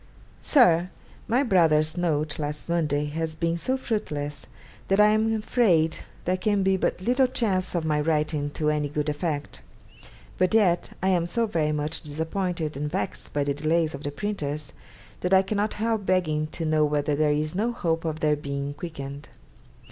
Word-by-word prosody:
'SIR, 180 - +4 0.4
My 250 +5 +2
brother's 160 - +3
note 155 -4 -1
last 150 0 -4
Monday 150 -4 0
has 160 +2 -3
been 165 +1 0
so 260 +10 -1
fruitless, 145 - -3 0.4
that 195 +1 +2
I 210 0 +7
am 215 +1 +2
afraid 210 -7 +2 0.3
there 185 +1 +1
can 200 +1 +1
be 190 0 +3
but 185 - -1
little 255 +6 +3
chance 190 -8 -1
of 165 -2 0
my 150 -1 +1
writing 150 -1 0
to 150 -1 +1
any 150 -1 -1
good 150 +1 -1
effect; 150 -1 -3 0.8
but 185 +4 +3
yet 180 -6 +3
I 190 - +3
am 175 -2 +2
so 230 +6 +1
very 160 -8 0
much 150 +1 -2
disappointed 160 +1 -3
and 150 +2 -3
vexed 185 +6 -4
by 145 - 0
the 140 0 0
delays 155 +2 +1
of 140 - -7
the 145 - -2
printers, 150 -4 -4 0.5
that 180 +1 +2
I 190 - +5
cannot 205 +2 -1
help 220 -1 0
begging 155 -5 +1
to 165 +1 -5
know 155 -1 +3
whether 150 0 +1
there 150 +1 +2
is 150 +1 -1
no 215 +6 0
hope 165 -8 -1
of 160 -1 -3
their 150 -1 +3
being 140 -1 -4
quickened. 145 -2 -7
160 Hz, 180 wpm, -26 LUFS, 150-190 Hz, 0.8 s, I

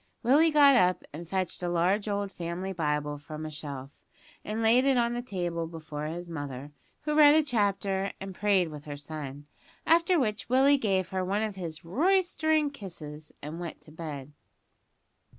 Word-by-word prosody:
Willie 290 +7 +5
got 290 -3 +6
up 180 -6 +3
and 165 +2 -8
fetched 190 -2 -2
a 175 - -1
large 180 +5 +1
old 200 -1 -1
family 175 +2 -4
Bible 150 -3 -1
from 155 +2 -7
a 155 - -5
shelf, 140 -3 -7 0.5
and 220 +2 -3
laid 235 +3 +5
it 270 -1 +3
on 235 0 +2
the 240 - -2
table 175 -7 -3
before 155 -2 -6
his 175 +2 -5
mother, 145 -3 -6 0.3
who 300 0 -2
read 300 -1 +8
a 315 - +5
chapter 200 -6 0
and 195 0 -6
prayed 195 -3 +2
with 150 -1 -9
her 145 -1 -6
son; 145 -1 -7 0.4
after 335 +2 +4
which 215 -4 -2
Willie 270 +3 +5
gave 190 -5 0
her 190 -1 -1
one 200 +4 0
of 215 -2 -3
his 170 -4 -7
"roystering" 315 - +2
kisses 155 - -9
and 155 +3 -6
went 170 -2 -6
to 155 - -16
bed. 150 -3 -7
185 Hz, 175 wpm, -29 LUFS, 155-235 Hz, 0.5 s, read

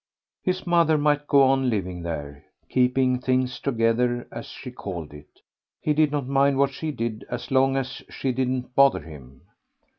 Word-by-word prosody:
His 185 0 -2
mother 170 -3 +3
might 145 0 +1
go 140 -1 +5
on 135 -1 +3
living 95 -5 -2
there, 75 -4 -6 0.3
keeping 125 0 +2
things 130 -1 0
together 120 -1 0
as - - -7
she 125 - -9
called 85 - -7
it; 75 0 -15 0.4
he 150 - 0
did 150 -1 +3
not 145 -3 -1
mind 140 +1 +2
what 140 0 +3
she 155 +3 -5
did 115 -5 -4
as 125 - -5
long 135 0 +3
as 135 -1 -4
she 135 - -2
didn't 130 0 -2
bother 140 -5 +5
him. 70 -4 -13
130 Hz, 170 wpm, -24 LUFS, 115-140 Hz, 0.4 s, go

